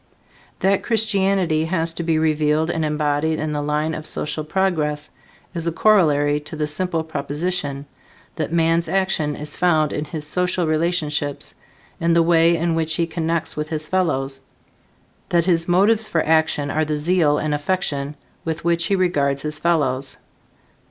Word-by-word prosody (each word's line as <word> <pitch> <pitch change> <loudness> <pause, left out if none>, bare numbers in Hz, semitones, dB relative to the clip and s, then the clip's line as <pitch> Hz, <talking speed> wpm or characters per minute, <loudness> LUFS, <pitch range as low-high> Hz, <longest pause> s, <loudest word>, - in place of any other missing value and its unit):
That 195 +1 +2
Christianity 195 -7 +1
has 165 -1 0
to 170 - -5
be 165 -1 +1
revealed 155 +1 +1
and 160 - -1
embodied 150 +1 0
in 155 0 -2
the 145 - -1
line 150 +2 -1
of 155 0 -6
social 150 +1 -3
progress 155 -4 -1 0.4
is 170 -2 -3
a - - +1
corollary 150 -7 +3
to 150 +1 -9
the 150 -1 -1
simple 165 +2 -1
proposition, 145 -1 -3 0.5
that 155 -1 -3
man's 165 0 +2
action 190 -6 0
is 150 0 -4
found 160 -4 +2
in 150 - -2
his 150 0 -5
social 180 +2 0
relationships 155 -3 -1 0.5
in 170 0 +2
the 170 0 +4
way 165 0 +4
in 170 +1 0
which 160 -1 0
he 170 - +1
connects 165 0 -2
with 150 0 -3
his 155 -1 -3
fellows; 135 -8 -1 0.9
that 170 -1 +2
his 170 -2 +2
motives 205 +5 +3
for 160 - 0
action 155 -2 +2
are 155 - +1
the 150 -1 -1
zeal 155 -1 +2
and 155 0 -1
affection 145 -2 -1 0.3
with 165 0 -4
which 170 0 +2
he 200 - +2
regards 140 -7 +1
his 150 0 -4
fellows. 140 -6 0
160 Hz, 160 wpm, -21 LUFS, 150-170 Hz, 0.9 s, the